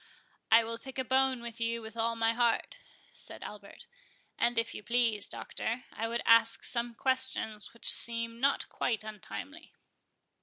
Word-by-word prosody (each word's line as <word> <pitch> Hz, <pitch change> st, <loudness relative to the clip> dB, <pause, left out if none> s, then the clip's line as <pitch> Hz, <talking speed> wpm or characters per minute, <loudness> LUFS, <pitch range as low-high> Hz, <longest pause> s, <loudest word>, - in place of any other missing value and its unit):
"I 230 Hz, +1 st, +8 dB
will 230 Hz, 0 st, -5 dB
pick 265 Hz, -1 st, -10 dB
a 260 Hz, -, 0 dB
bone 260 Hz, -1 st, +2 dB
with 235 Hz, -1 st, -7 dB
you 230 Hz, 0 st, 0 dB
with 220 Hz, +1 st, -9 dB
all 230 Hz, 0 st, 0 dB
my 225 Hz, 0 st, +2 dB
heart," 240 Hz, -, 0 dB, 0.3 s
said -, -, -9 dB
Albert; 200 Hz, -1 st, -10 dB, 0.5 s
"and 235 Hz, 0 st, +1 dB
if 230 Hz, 0 st, 0 dB
you -, -, -7 dB
please, 230 Hz, -2 st, +1 dB
Doctor, 235 Hz, +3 st, -4 dB
I 225 Hz, -, -2 dB
would 235 Hz, +1 st, -2 dB
ask 230 Hz, 0 st, +5 dB
some 235 Hz, -1 st, -1 dB
questions 255 Hz, -5 st, 0 dB
which 235 Hz, -, -14 dB
seem 230 Hz, 0 st, +3 dB
not 275 Hz, +2 st, +1 dB
quite 225 Hz, -3 st, -2 dB
untimely." 285 Hz, -, -9 dB
230 Hz, 160 wpm, -31 LUFS, 225-245 Hz, 0.5 s, I